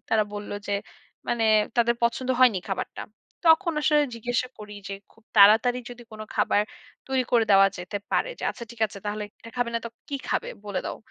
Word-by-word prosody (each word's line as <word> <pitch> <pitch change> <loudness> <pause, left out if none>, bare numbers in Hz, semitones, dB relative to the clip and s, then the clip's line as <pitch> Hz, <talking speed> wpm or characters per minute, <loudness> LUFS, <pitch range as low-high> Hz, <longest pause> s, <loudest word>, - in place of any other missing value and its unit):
তারা 220 -1 +3
বলল 205 0 -6 0.2
যে 205 - -2 0.6
মানে 230 -1 +1 0.3
তাদের 235 0 +3
পছন্দ 240 +2 0
হয়নি 245 -7 +6
খাবারটা। 195 - -4 0.4
তখন 335 +2 +5
আসলে 300 0 +4
জিজ্ঞাসা 245 +2 -1
করি 210 -1 -9 0.2
যে - - -5 0.2
খুব 225 - -25
তাড়াতাড়ি 220 +5 +7
যদি 245 0 -10
কোন 215 - -9
খাবার 205 - +3 0.4
তৈরি 265 -1 +1
করে 235 -2 +5
দেওয়া 195 0 +7
যেতে 180 +3 -5 0.2
পারে, - - +2
যে - - -10
"আচ্ছা 235 - -8
ঠিক 235 - -16
আছে, 200 - -11
তাহলে 210 0 -2 0.2
এটা 230 - -11
খাবে 245 -1 0
না - - +2
তো 235 - -3 0.2
কি 285 - -4
খাবে? - - -1 0.2
বলে 200 -2 -2
দাও।" - - -4
230 Hz, 195 wpm, -26 LUFS, 210-245 Hz, 0.6 s, তাড়াতাড়ি